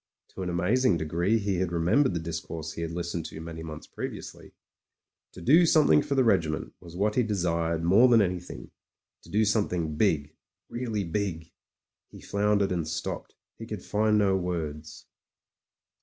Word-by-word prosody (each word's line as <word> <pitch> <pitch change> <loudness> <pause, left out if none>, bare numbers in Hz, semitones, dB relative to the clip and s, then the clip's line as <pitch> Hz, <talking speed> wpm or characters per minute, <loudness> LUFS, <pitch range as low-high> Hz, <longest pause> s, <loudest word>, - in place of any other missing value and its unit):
To - - -9
an 90 - -2
amazing 90 +5 +2
degree 85 +7 +1
he 100 -3 -1
had 90 -1 -1
remembered 90 - +2
the - - 0
discourse 80 -1 -5
he - - -6
had 85 - -2
listened 85 -1 -4
to - - -9
many 80 0 -7
months 80 -1 -8
previ - - -6
ously; - - -12 0.8
to 90 - -12
do 155 - +6
something 155 -2 +5
for 140 -1 -2
the 130 - +4
regiment 85 -9 +1
was 85 -1 -12
what 105 +3 +1
he 125 - +2
desired 85 -6 -1
more 100 +9 +6
than 120 -2 +6
anything 90 -3 -3 0.3
— - - -58
^to - - -16
do 110 +2 +3
scmiething 90 -8 0
big, 80 -7 +1 0.3
really 115 -4 -3
big. 85 -2 -3 0.6
He - - -13
floundered 100 -1 +1
and 85 -4 -1
stopped; 80 - -5 0.2
he - - -7
could - - -6
find 105 0 +2
no 100 -2 +3
words. 80 -5 -4
90 Hz, 170 wpm, -27 LUFS, 80-105 Hz, 0.8 s, do